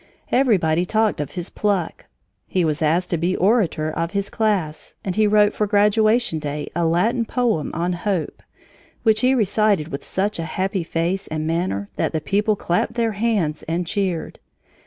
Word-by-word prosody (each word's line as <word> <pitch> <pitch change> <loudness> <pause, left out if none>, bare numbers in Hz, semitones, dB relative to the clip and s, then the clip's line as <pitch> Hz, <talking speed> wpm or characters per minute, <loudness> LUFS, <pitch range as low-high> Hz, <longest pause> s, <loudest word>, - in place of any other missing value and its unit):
Everybody 180 -11 +3
talked 215 -2 +1
of 145 - -6
his 175 0 -5
pluck. 200 -5 -1 0.4
He 180 -3 +1
was 155 0 -1
asked 165 +4 +1
to 170 - +1
be 175 +3 0
orator 185 -6 +1
of 165 +3 -3
his 200 0 -2
class, 190 -9 -1
and 185 -2 -2
he 215 -1 +3
wrote 210 0 +4
for 210 - 0
graduation 215 -1 +3
day 150 0 -5
a 170 -1 +1
Latin 220 +9 +2
poem 230 - 0
on 175 +2 0
Hope, 175 -1 -2 0.6
which 220 -1 +4
he 255 +1 +4
recited 210 -7 +2
with 140 - -5
such 200 0 -2
a 165 - -2
happy 190 -1 0
face 170 +4 -2
and 155 0 -3
manner 160 - -1
that - - 0
the 160 - 0
people 205 +8 +1
clapped 175 +1 -1
their 230 -2 +1
hands 200 -8 0
and 170 +2 -1
cheered. 180 -2 -2
185 Hz, 175 wpm, -21 LUFS, 165-215 Hz, 0.6 s, wrote